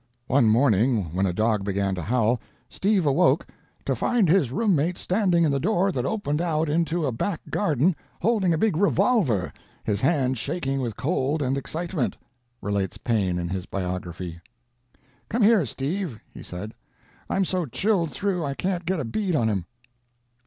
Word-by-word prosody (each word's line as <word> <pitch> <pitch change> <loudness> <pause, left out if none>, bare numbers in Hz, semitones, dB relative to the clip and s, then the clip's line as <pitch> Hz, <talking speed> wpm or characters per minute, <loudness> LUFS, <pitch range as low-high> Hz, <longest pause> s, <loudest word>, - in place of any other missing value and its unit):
One 130 -4 +3
morning, 110 - +3
when 95 +2 +1
a - - 0
dog 110 +2 +1
began 100 0 0
to 90 - -3
howl, 115 +4 +1 0.3
Steve 195 -3 +1
awoke 140 +2 +3 0.4
"to - - 0
find 230 -6 +2
his 160 -7 +3
room 210 - +2
mate 165 +5 0
standing 180 -3 +2
in 155 - +3
the 140 - +1
door 195 +3 +2
that 130 -5 -2
opened 155 -7 -1
out 160 -2 0
into 165 +1 +1
a 135 - 0
back 165 - -2
garden, 165 - +2 0.2
holding 205 -3 +2
a 165 - +2
big 210 0 +2
revolver, 175 - +2 0.3
his 105 -1 -1
hand 130 -4 +1
shaking 135 -1 -2
with 115 -5 -3
cold 145 0 0
and 130 0 0
excitement," 160 +1 -3 0.5
relates 100 -2 -1
Paine 100 -7 0
in 85 -1 -3
his 95 0 -4
Biography. 90 -2 -4 0.9
"'Come 230 0 +1
here, 205 - +5
Steve,' 145 - -3
he - - -10
said. 100 +5 -7 0.6
'I'm 195 - +1
so 180 -3 -1
chilled 180 - +1
through 180 +5 -1
I 140 -2 -2
can't 180 0 -2
get 185 -1 0
a 135 - -2
bead 180 - -1
on 115 -6 +2
him.' 95 -5 -1
140 Hz, 170 wpm, -25 LUFS, 110-180 Hz, 0.9 s, here